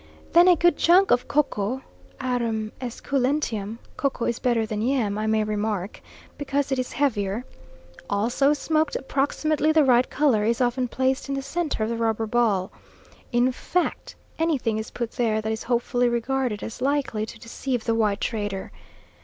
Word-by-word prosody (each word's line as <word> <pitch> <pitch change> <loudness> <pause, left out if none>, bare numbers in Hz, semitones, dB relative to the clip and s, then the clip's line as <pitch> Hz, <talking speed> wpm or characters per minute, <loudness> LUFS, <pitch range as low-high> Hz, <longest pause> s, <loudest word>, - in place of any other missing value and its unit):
Then 345 +2 +7
a 360 - +7
good 345 -1 +3
chunk 370 +3 +5
of 245 - +3
Koko, 260 -3 0 0.4
Arum 230 -4 -1
esculentum 250 -4 -1 0.2
(Koko 275 -4 -1
is 235 - -1
better 240 -3 +1
than 215 -1 -3
yam, 235 -4 +1
I 215 - -1
may 220 0 +2
remark, 210 -2 -2 0.4
because 280 -1 -1
it 265 - +1
is 255 - -3
heavier), 230 -4 0 0.6
also 240 +7 +2
smoked 310 +1 0
approximately 290 +3 0
the 315 -1 +5
right 250 -2 +4
colour, 260 -7 +2
is 230 +2 +1
often 250 0 +1
placed 260 +2 -1
in 275 - -1
the 275 - -3
centre 300 -4 -2
of 215 - -1
the 230 - -2
rubber 225 -1 0
ball. 215 -5 +1 0.6
In 245 +1 +3
fact, 355 +7 -2 0.2
anything 275 -10 +1
is 220 - -5
put 235 -2 -4
there, 225 -3 0
that 220 0 -2
is 220 - -3
hopefully 245 0 +1
regarded 240 -2 -1
as 225 +2 -7
likely 270 -5 0
to - - -10
deceive 245 +1 -3
the 230 - +1
white 210 -3 +1
trader. 205 -4 -3
245 Hz, 165 wpm, -24 LUFS, 220-275 Hz, 0.6 s, Then